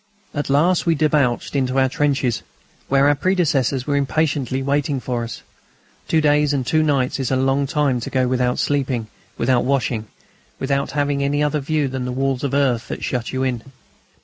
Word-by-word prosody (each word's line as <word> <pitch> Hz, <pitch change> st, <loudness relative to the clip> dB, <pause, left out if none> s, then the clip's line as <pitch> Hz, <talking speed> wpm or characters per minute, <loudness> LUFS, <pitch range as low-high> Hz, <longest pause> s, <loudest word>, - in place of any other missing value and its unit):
At 145 Hz, -1 st, -3 dB
last 165 Hz, +6 st, +2 dB
we 165 Hz, -, +4 dB
debouched 145 Hz, -5 st, +1 dB
into 130 Hz, -1 st, 0 dB
our 130 Hz, 0 st, +4 dB
trenches, 140 Hz, -4 st, 0 dB, 0.5 s
where 135 Hz, +1 st, +4 dB
our 145 Hz, -, +5 dB
predecessors 145 Hz, -6 st, +1 dB
were 145 Hz, -, 0 dB
impatiently 140 Hz, -2 st, 0 dB
waiting 140 Hz, 0 st, 0 dB
for 125 Hz, -2 st, -3 dB
us. 115 Hz, -, -7 dB, 0.6 s
Two 160 Hz, -, +2 dB
days 150 Hz, -1 st, +3 dB
and 135 Hz, -3 st, -1 dB
two 155 Hz, +5 st, +2 dB
nights 140 Hz, -4 st, +1 dB
is 130 Hz, -, -1 dB
a 130 Hz, -, +1 dB
long 135 Hz, +2 st, +1 dB
time 140 Hz, -4 st, +1 dB
to -, -, -5 dB
go 130 Hz, -1 st, +1 dB
without 125 Hz, -1 st, 0 dB
sleeping, 130 Hz, -6 st, -1 dB, 0.3 s
without 120 Hz, 0 st, +2 dB
washing, 125 Hz, -5 st, -1 dB, 0.5 s
without 140 Hz, 0 st, -1 dB
having 145 Hz, -1 st, 0 dB
any 145 Hz, +1 st, +1 dB
other 150 Hz, +1 st, 0 dB
view 150 Hz, 0 st, 0 dB
than 130 Hz, -1 st, -4 dB
the 125 Hz, -, -3 dB
walls 135 Hz, 0 st, -1 dB
of 140 Hz, -1 st, -1 dB
earth 130 Hz, -5 st, +1 dB
that -, -, -6 dB
shut 120 Hz, -3 st, -2 dB
you 130 Hz, 0 st, -1 dB
in. 125 Hz, -3 st, -1 dB
135 Hz, 185 wpm, -21 LUFS, 130-145 Hz, 0.6 s, our